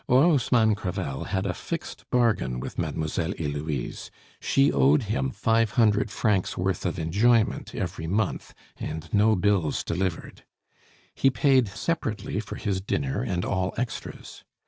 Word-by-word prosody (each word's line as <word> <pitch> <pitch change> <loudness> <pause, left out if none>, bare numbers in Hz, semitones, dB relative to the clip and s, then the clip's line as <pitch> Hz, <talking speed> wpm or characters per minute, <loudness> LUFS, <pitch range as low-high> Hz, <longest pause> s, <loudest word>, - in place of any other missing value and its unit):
Orosmanes 125 -6 +4
Crevel 85 -8 -4
had 95 0 -2
a 90 - -1
fixed - - -6
bargain 110 - +1
with - - -6
Mademoiselle 80 +3 -2
Heloise; 75 -3 -4 0.3
she 135 +1 +3
owed 70 - +4
him 65 -11 -1
five 115 - +1
hundred 110 -3 +3
francs 100 -2 0
worth 90 0 -1
of 85 - -3
enjoyment 105 +8 +2
every 80 - -4
month, 100 +3 -1 0.2
and 80 +1 -5
no 110 +1 +4
"bills 90 -5 +1
delivered." 90 -1 -3 0.7
He 135 - +3
paid 130 -2 +3
separately 110 - -2
for 105 - -6
his 95 -2 -2
dinner 70 -8 -1
and 90 -1 -2
all 95 -1 -1
extras. 120 -2 -6
100 Hz, 135 wpm, -26 LUFS, 80-115 Hz, 0.7 s, Orosmanes